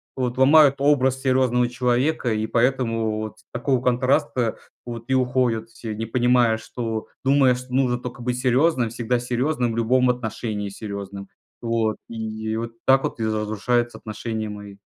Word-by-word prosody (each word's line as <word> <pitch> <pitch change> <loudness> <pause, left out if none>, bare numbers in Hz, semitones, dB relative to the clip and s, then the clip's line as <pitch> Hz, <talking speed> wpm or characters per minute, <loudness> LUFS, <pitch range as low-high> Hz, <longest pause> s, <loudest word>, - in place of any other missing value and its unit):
вот 125 -1 -2
ломают 140 +1 +6
образ 135 -2 +2
серьезного 130 -2 +2
человека, 125 +2 0
и 110 0 0
поэтому 115 -3 0
вот 110 -1 -6
с - - -24
такого 125 +1 0
контраста 125 -2 +1 0.3
вот 115 -1 -7
и 130 - +1
уходят 125 -3 +1
все, 110 -2 -7
не 115 +1 -3
понимая, 120 -1 +3
что 110 -1 -4 0.2
думая, 135 -2 +4
что 125 0 -9
нужно 130 -2 +2
только 125 0 -8
быть 125 0 -2
серьезным, 130 -1 +2
всегда 120 +1 -1
серьезным, 125 0 -1
в - - -5
любом 125 +2 +3
отношении 110 -3 -4
серьезным. 100 -1 -7 0.4
Вот, 115 -2 0
и 110 -1 -4
вот 115 0 -4
так 135 0 +5
вот 115 - -3
и - - 0
за, 110 -1 0
разрушаются 120 +3 -1
отношения 110 0 -5
мои. 105 -1 -9
120 Hz, 160 wpm, -23 LUFS, 110-125 Hz, 0.4 s, ломают